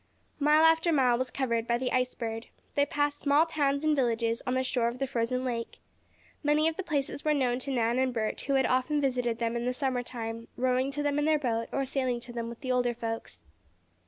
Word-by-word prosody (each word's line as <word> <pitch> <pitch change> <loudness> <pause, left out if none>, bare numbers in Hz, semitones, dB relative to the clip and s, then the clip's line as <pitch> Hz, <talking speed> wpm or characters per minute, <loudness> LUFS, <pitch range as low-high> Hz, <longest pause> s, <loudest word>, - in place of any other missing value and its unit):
Mile 300 +2 +5
after 325 +1 +4
mile 260 -5 +4
was 255 +1 -1
covered 235 -4 -1
by 235 - +2
the 250 +1 -2
Ice 255 0 0
Bird. 225 0 -4 0.3
They 285 0 +2
passed 290 0 0
small 290 +3 +4
towns 285 -3 0
and 310 -1 +3
villages 230 -3 0
on 250 - +1
the 260 - +1
shore 250 -2 0
of 235 +1 -3
the 270 - -1
frozen 250 0 -1
lake. 235 -2 -3 0.6
Many 300 +1 +3
of 325 - 0
the 385 - -3
places 285 -4 -2
were 305 -1 +2
known 250 -3 +1
to 275 +2 -4
Nan 240 -1 +1
and 260 0 +2
Bert, 220 -3 -2
who 275 - 0
had 265 -1 +3
often 260 +4 +1
visited 250 -4 0
them 230 0 -1
in 235 0 -2
the 250 - 0
summer 255 -1 -1
time, 230 -2 -6
rowing 255 +1 +1
to 290 +1 -3
them 290 0 +1
in 295 - +1
their 310 0 +4
boat, 230 -5 -1
or 275 - 0
sailing 255 -2 -1
to 240 0 -7
them 230 -1 -4
with 235 - -10
the 255 - -2
older 245 -1 +1
folks. 225 - -5
255 Hz, 235 wpm, -29 LUFS, 235-285 Hz, 0.6 s, Mile